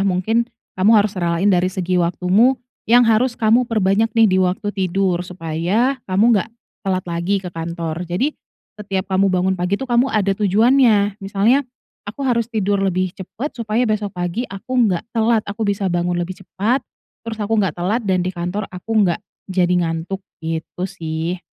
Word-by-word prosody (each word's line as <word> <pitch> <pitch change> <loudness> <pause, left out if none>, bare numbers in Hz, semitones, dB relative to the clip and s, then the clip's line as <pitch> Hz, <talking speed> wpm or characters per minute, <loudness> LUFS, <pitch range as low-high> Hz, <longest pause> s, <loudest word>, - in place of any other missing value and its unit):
Mungkin, 210 +5 +1 0.3
kamu 190 +3 +3
harus 205 0 +2
relain 175 +1 0
dari 180 0 +2
segi 185 -1 -1
waktumu, 185 +9 +3 0.3
yang 240 +1 +6
harus 235 +2 +2
kamu 235 +1 +3
perbanyak 215 0 +2
nih, 225 - +6
di 190 -2 +2
waktu 195 +3 0
tidur, 185 -1 0
supaya, 180 - -1
kamu 190 +4 +3
nggak 205 +2 0 0.3
telat 185 -2 -1
lagi 170 +4 -1
ke 185 -2 -7
kantor. 165 0 -4
Jadi, 255 - 0 0.5
setiap 195 -1 -3
kamu 195 +1 +3
bangun 185 +1 +1
pagi 180 +3 0
tuh, 265 - -5
kamu 240 +2 +4
ada 200 -4 +1
tujuannya, 210 0 +3
misalnya, 205 +7 +2 0.5
"Aku 255 +7 -6
harus 235 -3 +1
tidur 205 -3 0
lebih 185 -1 0
cepat, 225 - -6
supaya 225 +1 0
besok 210 -3 -1
pagi 175 +8 -2
aku 195 +6 -8 0.2
nggak 180 -1 -1
telat, 225 -1 +2
aku 205 +1 -3
bisa 200 -2 0
bangun 175 0 0
lebih 175 +1 -4
cepat, 215 +7 -1 0.5
terus 225 -1 -4
aku 220 +1 0
nggak 185 -6 0
telat 190 +7 0
dan 185 -2 +2
di 185 - -1
kantor 180 +4 -3
aku 180 +5 -9
nggak 175 +3 0 0.3
jadi 180 -1 +2
ngantuk." 165 +4 -3 0.2
gitu 165 +3 -4
sih. 170 -1 -4
195 Hz, 170 wpm, -20 LUFS, 180-220 Hz, 0.5 s, yang